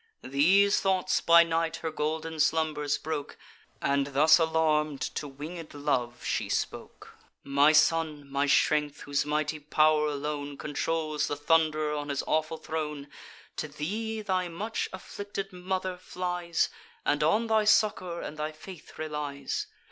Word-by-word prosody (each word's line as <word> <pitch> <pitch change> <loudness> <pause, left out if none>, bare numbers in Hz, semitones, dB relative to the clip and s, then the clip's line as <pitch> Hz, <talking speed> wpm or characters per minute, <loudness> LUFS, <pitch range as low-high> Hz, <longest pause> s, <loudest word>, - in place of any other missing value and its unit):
These 190 +10 +4
thoughts 185 -1 +1
by 170 0 +7
night 165 0 -1
her 165 -1 -4
golden 155 +1 -3
slumbers 155 -2 +1
broke, 155 -2 -5 0.5
And 140 0 +2
thus 155 +4 +6
alarm'd, 155 -3 +1
to 150 - -3
winged 155 +4 -8
Love 125 -5 -1
she - - -1
spoke: - - -4 0.3
"My 140 +2 +4
son, 155 -1 +2
my 140 +1 0
strength, 150 0 +2
whose 145 0 -1
mighty 155 +1 -1
pow'r 155 +1 +3
alone 145 -1 -4
Controls 155 +1 -1
the 145 - -2
Thund'rer 155 0 +2
on 145 -1 -4
his 140 -1 -1
awful 155 +1 0
throne, 150 -3 -4 0.5
To - - -2
thee 215 +10 -4
thy 185 -3 0
much 205 +7 -3
afflicted 195 +1 -6
mother 185 0 -3
flies, 180 -1 -2 0.4
And 145 - +1
on 210 +9 +3
thy 220 -1 +2
succour 200 -5 +2
and 150 - -7
thy 150 +1 -3
faith 165 +1 -12
relies. 150 -3 -4
155 Hz, 140 wpm, -28 LUFS, 150-175 Hz, 0.5 s, by